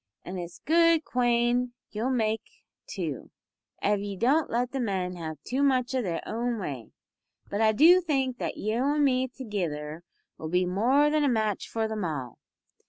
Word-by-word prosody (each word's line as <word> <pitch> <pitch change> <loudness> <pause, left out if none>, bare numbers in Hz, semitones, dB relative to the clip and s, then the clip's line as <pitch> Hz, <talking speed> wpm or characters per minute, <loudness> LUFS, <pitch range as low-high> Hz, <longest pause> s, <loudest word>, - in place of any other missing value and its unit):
An' 185 +1 -5
it's 175 0 -7
a - - -33
good 330 0 +4
quane 240 0 +1 0.2
you'll 220 +4 -2
make, 220 -4 0 0.5
too, - - -5 0.5
av 205 0 +2
ye 200 -1 -5
don't 275 - +2
let 245 +2 0
the 270 - -3
men 190 -6 -1
have 160 -3 -6
too 260 +3 -2
much 260 -3 +2
o' 260 - +1
their 175 -7 -3
own 235 +1 -2
way. 135 - -5 0.6
But 205 - -1
I 220 -1 +5
do 335 +11 +6
think 265 -7 -1
that - - -3
you 220 +4 -1
an' 290 +1 +2
me 260 -2 +2
togither'll 170 - -4 0.5
be 180 +2 +2
more 250 +11 +3
than 305 -1 +2
a 285 - +3
match 215 -4 -1
for 225 -1 -1
them 220 -2 -3
all. 140 -8 -4
230 Hz, 175 wpm, -27 LUFS, 190-260 Hz, 0.6 s, do